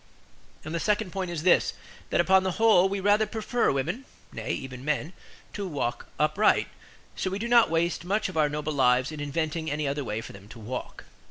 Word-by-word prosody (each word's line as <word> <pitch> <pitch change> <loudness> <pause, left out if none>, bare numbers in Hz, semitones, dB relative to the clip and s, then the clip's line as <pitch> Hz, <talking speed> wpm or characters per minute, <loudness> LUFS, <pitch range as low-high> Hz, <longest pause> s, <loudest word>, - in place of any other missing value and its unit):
And 155 - -5
the 170 - -1
second 210 0 0
point 190 -1 -3
is 165 -3 -4
this: 180 - +4 0.4
that - - +1
upon 190 0 +5
the 185 -1 -1
whole 200 -3 +5
we 200 0 -2
rather 205 +2 +3
prefer 225 +3 0
women 170 - -2 0.3
(nay, - - -6
even 130 -1 -5
men) 150 +3 -1 0.4
to 200 -1 -4
walk 140 -7 -3
upright; 155 +8 +3 0.5
so 185 - -2
we 190 - -3
do 225 +3 -3
not 235 -1 +5
waste 170 +1 0
much 205 +4 0
of 185 - -8
our 155 -2 +3
noble 150 +1 -3
lives 130 0 +3
in 155 - -7
inventing 160 +2 -2
any 150 0 -1
other 140 +1 -2
way 110 -3 -3
for 115 - -9
them 100 +1 -13
to 120 - -11
walk. 120 +4 -6
165 Hz, 205 wpm, -27 LUFS, 145-195 Hz, 0.5 s, upon